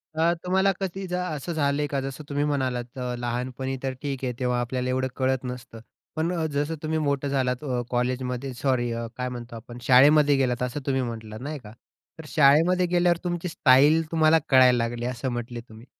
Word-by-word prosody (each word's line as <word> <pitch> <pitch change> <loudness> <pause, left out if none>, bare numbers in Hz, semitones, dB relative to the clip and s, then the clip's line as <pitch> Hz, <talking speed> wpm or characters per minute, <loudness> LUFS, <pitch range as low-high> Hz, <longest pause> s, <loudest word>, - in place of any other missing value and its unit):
तर 165 +2 +3
तुम्हाला 190 +2 +2
कधी 190 0 -4
असं 170 -2 -3
झालंय 145 -1 0
का 140 -1 -2
जसं 135 +3 -6
तुम्ही 145 +1 0
म्हणालात 130 -4 -2 0.2
लहानपणी 125 +2 -3
तर 135 -1 -1
ठीक 135 -2 -4
आहे 125 - -2
तेव्हा 125 -1 0
आपल्याला 125 +1 -2
एवढं 130 +1 0
कळत 130 -1 0
नसतं. 125 -2 -7 0.4
पण 160 +3 0 0.2
जसं 145 +3 -1
तुम्ही 160 0 -1
मोठं 140 -1 0
झालात 130 0 -1 0.3
कॉलेजमध्ये 125 +1 -2
सॉरी 120 -2 0 0.3
काय 125 0 -2
म्हणतो 120 -1 -8
आपण 120 +1 -10
शाळेमध्ये 145 +3 +6
गेलात 125 -2 0
असं 125 +4 -3
तुम्ही 135 -2 +1
म्हटलात 110 -2 -6
नाही 145 +1 -5
का. 105 -3 -13 0.5
तर 160 - -9
शाळेमध्ये 165 +6 +4
गेल्यावर 175 -1 +2
तुमची 175 0 -2
स्टाईल 145 +3 +5
तुम्हाला 160 0 +4
कळायला 130 -2 +6
लागली 120 +1 -2
असं 125 +1 -3
म्हटले 120 0 -5
तुम्ही 110 0 -15
130 Hz, 175 wpm, -25 LUFS, 125-150 Hz, 0.5 s, शाळेमध्ये